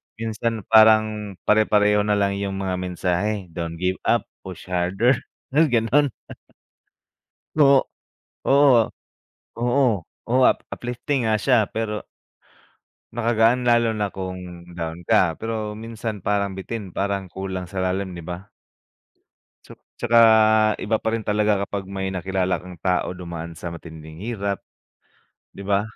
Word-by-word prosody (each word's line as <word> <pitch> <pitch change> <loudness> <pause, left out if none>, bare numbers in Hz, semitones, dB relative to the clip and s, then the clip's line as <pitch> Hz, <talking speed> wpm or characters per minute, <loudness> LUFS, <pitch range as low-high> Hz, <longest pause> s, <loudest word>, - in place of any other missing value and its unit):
Minsan 115 -1 -3
parang 110 -2 +5
pare-pareho 105 -1 +3
na 105 -1 +2
lang 100 -1 +1
yung 100 -1 -3
mga 95 -1 -1
mensahe. 90 +3 -1 0.2
"Don't 85 0 -5
give 95 0 0
up, 120 - +3 0.2
push 95 -2 -9
harder." 95 +8 +2 0.3
May, 155 +3 +4
gano'n. 125 +4 +2 1.5
No 140 -2 +6 0.6
Oo, 135 -5 +5 0.7
oo, 125 +2 +2 0.4
oo 125 +3 +2
up - - +5 0.2
uplifting 125 +2 -2
nga 110 - +3
siya 120 -3 +3
pero 105 -2 -3 1.1
Nakagaan 120 +1 +2
lalo 120 -1 +4
na 105 -2 -1
kung 90 -2 -8
down 85 0 -6
ka. 85 -1 +3
Pero 110 -1 -4
minsan 110 -2 -6
parang 100 -1 0
bitin, 95 -1 -6
parang 100 -1 -1
kulang 95 0 -5
sa 95 0 -3
lalim, 95 0 -2
'di 85 - -8
ba? 90 +4 -8 1.1
Ts - - -13 0.2
tsaka 120 0 +3 0.7
iba 110 +1 +1
pa 110 - -2
rin 115 - -1
talaga 105 0 +1
kapag 100 -1 -4
may 95 0 -4
nakilala 95 0 -1
kang 90 -2 -12
tao 90 -1 0
dumaan 85 -2 -7
sa 85 +1 -6
matinding 80 -2 -10
hirap, 100 -1 -3 0.9
'di 100 - -10
ba? 100 0 +2
100 Hz, 130 wpm, -23 LUFS, 90-115 Hz, 1.5 s, No